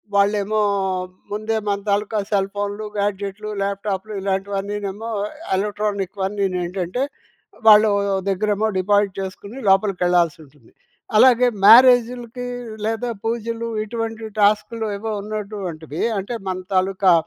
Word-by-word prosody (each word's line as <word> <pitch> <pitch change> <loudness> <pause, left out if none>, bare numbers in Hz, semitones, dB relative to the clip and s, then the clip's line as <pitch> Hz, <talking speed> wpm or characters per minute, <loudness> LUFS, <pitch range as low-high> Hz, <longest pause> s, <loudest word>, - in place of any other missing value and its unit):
వాళ్ళేమో 205 +1 +2 0.7
ముందే 220 +1 -1
మన 200 - 0
తాలూకా 210 +1 0
సెల్ 195 -1 +1
ఫోన్‌లు, 205 +1 -3
గ్యాడ్జెట్‌లు, 205 +1 -2
ల్యాప్టాప్‌లు 200 +1 -3
ఇలాంటివన్నీనేమో 200 +2 -3 0.5
ఎలక్ట్రానిక్‌వన్నీను 200 -2 -2
ఏంటంటే 180 +6 -2 0.6
వాళ్ళ 210 -1 +10 0.5
దగ్గరేమో 210 +2 +1
డిపాజిట్ 205 +1 +2
చేసుకొని 200 +5 -7
లోపలికెళ్ళాల్సి 180 -4 +2
ఉంటుంది. 140 -5 -22 0.5
అలాగే, 250 +1 +6 0.2
మ్యారేజ్‌‌లుకి 245 +1 +6 0.4
లేదా 225 +2 -1 0.2
పూజలు 230 0 -2 0.2
ఇటువంటి 225 0 -4 0.2
టాస్క్‌లు 215 +2 +2
ఏవో 220 +2 -4
ఉన్నటువంటివే 200 -7 -5 0.2
అంటే, 220 +5 -4
మన 185 0 -1 0.2
తాలూకా 185 0 +3
205 Hz, 95 wpm, -21 LUFS, 195-220 Hz, 0.7 s, వాళ్ళ